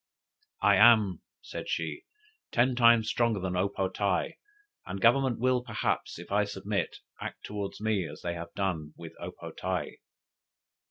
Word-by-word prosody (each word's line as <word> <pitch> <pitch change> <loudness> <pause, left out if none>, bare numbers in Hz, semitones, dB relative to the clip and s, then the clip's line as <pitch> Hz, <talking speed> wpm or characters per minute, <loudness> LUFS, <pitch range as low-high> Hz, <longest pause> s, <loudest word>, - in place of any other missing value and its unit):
"I 100 -1 +6
am," 105 -5 +6 0.2
said - - -7
she, 80 -2 -3 0.5
"ten 125 +2 +3
times 115 -2 +5
stronger 115 -3 +1
than 90 -1 -2
O 95 +2 +1
po 95 -1 -1
tae, 95 0 -1 0.5
and 95 +1 -4
government 125 +3 +4
will 125 0 +2
perhaps, - - -2
if 85 +2 -10
I 105 +1 +3
submit, 100 -2 -3 0.2
act - - -6
towards 100 -1 -5
me 105 -5 0
as 75 0 -10
they 85 - -2
have 85 0 -7
done 80 -6 -2
with 85 -1 -9
O - - -4
po - - -9
tae." - - -3
100 Hz, 160 wpm, -29 LUFS, 90-115 Hz, 0.5 s, I